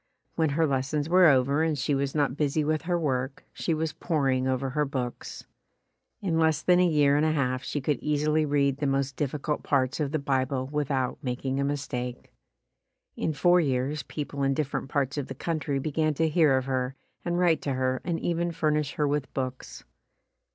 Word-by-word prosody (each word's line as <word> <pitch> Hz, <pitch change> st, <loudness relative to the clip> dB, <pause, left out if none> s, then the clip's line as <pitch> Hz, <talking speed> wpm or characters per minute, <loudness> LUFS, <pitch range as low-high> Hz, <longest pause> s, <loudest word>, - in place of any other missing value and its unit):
When 160 Hz, -2 st, +1 dB
her 165 Hz, -, +4 dB
lessons 140 Hz, +1 st, -1 dB
were 180 Hz, 0 st, +6 dB
over 140 Hz, +1 st, +3 dB
and 160 Hz, -2 st, +1 dB
she 145 Hz, -, 0 dB
was 140 Hz, +1 st, -1 dB
not 145 Hz, -4 st, +1 dB
busy 150 Hz, +1 st, 0 dB
with 155 Hz, +1 st, 0 dB
her 175 Hz, +1 st, 0 dB
work, 135 Hz, -4 st, -2 dB
she 165 Hz, -, -1 dB
was 160 Hz, 0 st, -2 dB
p'oring 135 Hz, -6 st, 0 dB
over 130 Hz, 0 st, -1 dB
her 150 Hz, +2 st, +1 dB
books. 130 Hz, -4 st, -5 dB, 0.8 s
In 165 Hz, -5 st, 0 dB
less 160 Hz, -1 st, +2 dB
than 180 Hz, 0 st, +4 dB
a 180 Hz, -, +5 dB
year 145 Hz, -3 st, +3 dB
and 150 Hz, -, +2 dB
a 155 Hz, -, +3 dB
half 130 Hz, -3 st, 0 dB
she 145 Hz, -, -3 dB
could 145 Hz, +1 st, 0 dB
easily 150 Hz, +1 st, +1 dB
read 140 Hz, -2 st, +1 dB
the 145 Hz, -, -1 dB
most 135 Hz, 0 st, 0 dB
difficult 150 Hz, +2 st, -2 dB
parts 135 Hz, 0 st, 0 dB
of 145 Hz, -3 st, -1 dB
the 155 Hz, -, +1 dB
Bible 135 Hz, -2 st, -1 dB
without 140 Hz, -3 st, -1 dB
making 130 Hz, 0 st, -2 dB
a -, -, +1 dB
mistake. 130 Hz, -3 st, -4 dB, 0.8 s
In -, -, -1 dB
four 175 Hz, +4 st, +4 dB
years 135 Hz, +1 st, -1 dB
people 145 Hz, -2 st, -5 dB
in 135 Hz, 0 st, +2 dB
different 140 Hz, -2 st, -2 dB
parts 140 Hz, 0 st, -1 dB
of 140 Hz, -, -4 dB
the 135 Hz, -, -7 dB
country 155 Hz, -2 st, -2 dB
be 150 Hz, +3 st, -3 dB
gan 155 Hz, 0 st, +1 dB
to 160 Hz, +3 st, +2 dB
hear 155 Hz, -4 st, +4 dB
of 130 Hz, -, -2 dB
her 130 Hz, 0 st, -2 dB, 0.3 s
and 175 Hz, 0 st, -1 dB
write 175 Hz, -3 st, +3 dB
to 140 Hz, -, -2 dB
her 130 Hz, 0 st, 0 dB
and 170 Hz, -2 st, -2 dB
even 170 Hz, 0 st, -1 dB
fur 160 Hz, -2 st, 0 dB
nish 150 Hz, -2 st, -1 dB
her 150 Hz, -, 0 dB
with 145 Hz, -1 st, -1 dB
books. 130 Hz, -1 st, -5 dB
145 Hz, 200 wpm, -27 LUFS, 135-155 Hz, 0.8 s, were